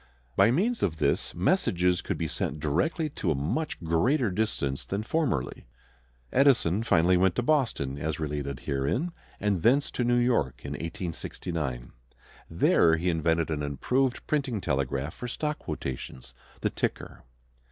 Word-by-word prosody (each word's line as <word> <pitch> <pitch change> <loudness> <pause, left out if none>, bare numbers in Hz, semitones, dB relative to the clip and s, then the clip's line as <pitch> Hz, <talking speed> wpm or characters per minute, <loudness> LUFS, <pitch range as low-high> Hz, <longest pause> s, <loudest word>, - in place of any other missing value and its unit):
By 100 +3 +5
means 210 - +1
of 80 -4 0
this 70 -2 0
messages 90 0 +2
could - - -3
be - - -1
sent 75 - -3
direct 95 - 0
to 90 - -1
a 80 - +2
much 80 - -2
greater 110 - +2
distance 90 -9 -1
than 100 +2 -3
formerly. 125 - -1 0.7
Edison 125 - +4
finally 90 -4 +4
went 95 0 +3
to 120 - 0
Boston, 115 - 0
as 80 +1 -2
related 70 -4 -3
herein, 70 - -1 0.3
and 100 -4 0
thence 135 - +3
to 125 - -1
New 120 0 +3
York, 120 0 +1
in - - -4
1869. 80 - -4 0.6
There 80 -1 +4
he 90 +2 +1
invented 80 0 +1
an 75 -1 -1
improved 120 - 0
printing 135 -7 0
telegraph 70 -2 -1
for 125 - -6
stock 150 +4 -2
quotations, 65 -1 -6 0.3
the - - 0
ticker. - - -3
90 Hz, 145 wpm, -28 LUFS, 75-125 Hz, 0.7 s, By